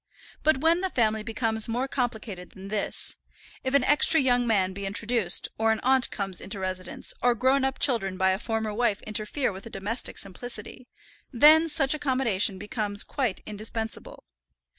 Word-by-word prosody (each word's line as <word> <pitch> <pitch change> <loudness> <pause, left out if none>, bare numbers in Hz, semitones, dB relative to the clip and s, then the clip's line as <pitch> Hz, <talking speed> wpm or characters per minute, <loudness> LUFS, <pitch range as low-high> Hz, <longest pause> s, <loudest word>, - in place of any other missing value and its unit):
But 310 -4 +2
when 330 +2 +3
the 380 - -1
family 220 -7 +1
becomes 220 0 0
more 245 +4 -1
complicated 220 -8 -4
than 195 +1 -10
this, 210 0 -1 0.5
if 260 +1 -1
an 280 - +4
extra 295 +2 +6
young 245 -2 +2
man 190 -4 +1
be 200 0 -5
introduced, 215 -2 +1
or 225 0 +3
an 220 - 0
aunt 260 -1 +3
comes 195 -3 -2
into 200 +2 -5
residence, 185 -1 -2
or 245 -1 +3
grown 260 +3 +2
up 265 0 -1
children 195 -8 +1
by 190 0 +3
a 190 - -1
former 220 -2 -2
wife 215 -2 0
interfere 215 +5 -2
with 190 +2 -10
the - - -8
domestic 210 +4 -4
simplicity, 240 +4 -6 0.4
then 310 +6 +6
such 285 -3 +2
accommodation 255 -10 0
becomes 205 0 -2
quite 255 -9 -2
indispensable. 220 +1 -5
225 Hz, 165 wpm, -26 LUFS, 200-260 Hz, 0.5 s, extra